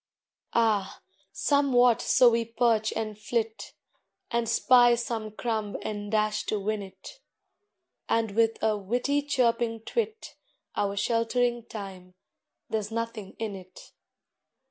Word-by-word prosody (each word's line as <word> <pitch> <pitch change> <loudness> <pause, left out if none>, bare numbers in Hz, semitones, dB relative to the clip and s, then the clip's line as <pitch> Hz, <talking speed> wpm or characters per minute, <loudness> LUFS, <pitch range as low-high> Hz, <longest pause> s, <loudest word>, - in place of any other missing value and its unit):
Ah, 215 -4 +1 0.3
somewhat 250 -5 +3
so 245 -2 +5
we 230 0 +1
perch 230 -1 +1
and 215 -2 -4
flit, 220 +1 -3 0.6
And 235 -1 0
spy 240 +1 +5
some 230 -2 -3
crumb 215 -1 -3
and 205 -1 -5
dash 215 0 +1
to 215 - 0
win 210 +1 -2
it, 190 - -11 0.9
And 225 -2 +1
with 225 +2 +2
a 220 -1 +3
witty 245 +8 0
chirping 235 -5 0
twit 445 - -4 0.4
Our 200 0 -1
sheltering 235 +1 0
Time 190 -4 -9 0.5
there's 215 -2 -2
nothing 230 -3 -4
in 220 -3 -4
it! 185 -1 -13
225 Hz, 120 wpm, -27 LUFS, 210-240 Hz, 0.9 s, so